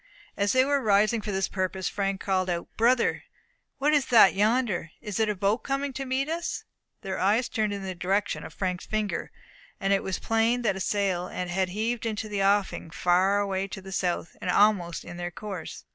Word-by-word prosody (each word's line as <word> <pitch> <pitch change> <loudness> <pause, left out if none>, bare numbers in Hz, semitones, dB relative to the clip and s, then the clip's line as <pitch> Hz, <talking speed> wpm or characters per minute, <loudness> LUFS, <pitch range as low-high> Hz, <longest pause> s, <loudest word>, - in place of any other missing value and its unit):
As 200 0 +1
they 260 0 +5
were 285 0 +1
rising 215 +1 +3
for 210 - -4
this 190 -1 0
purpose, 185 0 -2
Frank 195 -1 -1
called 185 -2 0
out, 170 -1 -4
"Brother, 235 +2 +2 0.5
what 295 +2 +2
is 290 -3 +3
that 220 -6 +7
yonder? 210 -4 +1
Isn't 215 +1 -1
it - - +3
a - - -3
boat 200 +4 +1
coming 275 +1 -2
to 270 +1 -4
meet 265 +2 0
us?" 335 +2 -3 0.4
Their 190 -1 -3
eyes 215 +6 +2
turned 215 -3 -1
in 200 -1 -4
the 190 -1 -4
direction 195 +3 -1
of - - -8
Frank's 180 -2 -3
finger 215 -2 -2 0.5
and 195 -1 +1
it 195 - +2
was 190 - -2
plain 225 +2 +1
that 205 -4 +1
a - - -5
sail 190 -2 0
had 180 -1 -4 0.2
heaved 225 +4 -2
into 215 0 -3
the 205 -2 -2
offing 195 -4 +1
far 180 +4 +2
away 195 -1 -1
to 195 - -7
the 190 0 -10
south, 180 -2 -2
and 185 - -3
almost 180 -4 +3
in 175 - -8
their 175 0 -3
course. 190 -1 -7
200 Hz, 205 wpm, -27 LUFS, 190-225 Hz, 0.5 s, that